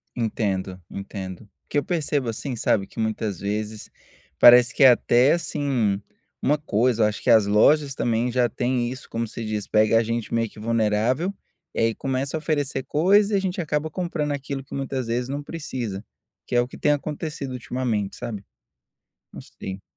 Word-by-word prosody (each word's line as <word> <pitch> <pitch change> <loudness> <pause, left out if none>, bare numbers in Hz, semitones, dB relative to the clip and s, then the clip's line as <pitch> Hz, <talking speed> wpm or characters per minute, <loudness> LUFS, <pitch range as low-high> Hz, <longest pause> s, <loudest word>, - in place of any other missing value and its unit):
Entendo, 100 -5 -2
entendo. 95 -2 -7
O 105 - -21 0.2
que - - -1
eu 145 - +2
percebo, 150 -6 -1
assim, 125 +4 -4
sabe, 100 -2 +1
que 115 - -11
muitas 110 -4 -2
vezes 105 +1 -4 0.5
parece 125 +2 +8
que 140 - +4
é 130 - +10
até 125 +3 +4
assim, 135 -11 0 0.4
uma 150 +2 +2
coisa 120 -4 +1
eu 105 - +5
acho 105 - -4
que - - 0
as 110 -3 +6
lojas 135 +7 +4
também 120 +1 0
já 120 0 +2
têm 120 -1 -1
isso 130 +1 -8
como 115 0 -2
se 115 +1 -6
diz, 105 -2 -3
pega 110 +1 +4
a - - +1
gente 115 0 -3
meio 115 -1 +1
que - - -15
vulnerável, 115 - +1 0.4
e - - -3
aí 115 -1 +2
começa 135 +2 -2
a - - -1
oferecer 145 -4 -1
coisa 200 +7 +3
e - - +4
a - - +2
gente 185 -1 -2
acaba 150 0 -1
comprando 155 -4 -2
aquilo 135 -1 -5
que - - -8
muitas 135 -3 -3
vezes 120 +2 -1
não 140 +1 -3
precisa, 130 -10 -5 0.4
que - - -3
é 120 - +5
o 120 - -2
que - - -11
tem 150 - +2
acontecido 145 -1 -3
ultimamente, 120 -5 -2
sabe? 105 -4 -6 0.9
Não - - -8
sei. 95 0 -8
120 Hz, 190 wpm, -24 LUFS, 110-145 Hz, 0.9 s, é